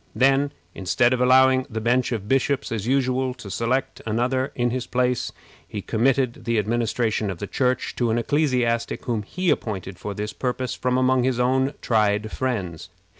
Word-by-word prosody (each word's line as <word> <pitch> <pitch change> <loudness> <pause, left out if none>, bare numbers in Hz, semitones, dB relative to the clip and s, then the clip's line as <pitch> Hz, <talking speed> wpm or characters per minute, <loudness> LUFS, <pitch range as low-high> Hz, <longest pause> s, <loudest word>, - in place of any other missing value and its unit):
Then, 135 +2 +3 0.2
instead 120 +6 +2
of 125 - 0
allowing 130 +1 +5
the 110 -2 -3
bench 120 +3 +1
of 105 -4 -3
bishops, 135 +2 +1
as 110 -1 -3
usual, 130 -1 +1
to 105 +1 -5
elect 130 +3 -1
another 125 +4 0
in 120 -1 +1
his 125 0 -3
place, 125 0 0 0.4
he 105 -2 -6
committed 125 +2 +1
the 115 -1 +1
administration 110 0 0
of 95 - -4
the 100 - -4
Church 125 +3 -1
to 120 -2 +1
an 110 - +1
ecclesiastic 125 -3 0
whom 115 -3 -1
he 180 - -1
appointed 95 -4 -3
for 100 +1 -5
this 105 +2 -4
purpose 125 -1 -2
from 125 0 0
among 130 0 +3
his 125 -1 0
own 130 +3 +2
tried 105 -1 +1
friends. 95 -10 -3
125 Hz, 175 wpm, -23 LUFS, 110-130 Hz, 0.4 s, allowing